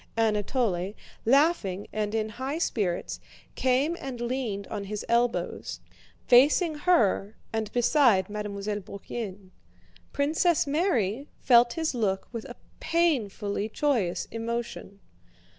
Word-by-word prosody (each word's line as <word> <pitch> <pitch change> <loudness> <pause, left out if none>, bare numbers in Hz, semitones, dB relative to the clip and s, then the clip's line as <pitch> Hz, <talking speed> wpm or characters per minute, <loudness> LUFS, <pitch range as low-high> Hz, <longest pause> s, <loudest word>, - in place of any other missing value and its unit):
Anatole, 210 -3 0 0.3
laughing 235 - +2
and 210 0 -1
in 220 -1 0
high 260 +7 -4
spirits, 200 - -1 0.3
came 265 +6 +1
and 260 -3 -6
leaned 240 -5 -2
on 200 - -4
his 210 +1 -5
elbows, 235 +1 0 0.5
facing 290 +7 +5
her 225 - +2 0.2
and 220 -1 -2
beside 245 -5 +4
Mademoiselle 210 0 -4
Bourienne. 200 -1 -7 0.6
Princess 320 +4 +2
Mary 280 - 0
felt 240 -2 +5
his 320 -3 -1
look 200 -6 -1
with 230 -3 -6
a 240 - -9 0.2
painfully 230 - 0
joyous 215 -10 0
emotion. 230 -3 -5
230 Hz, 110 wpm, -27 LUFS, 205-275 Hz, 0.6 s, facing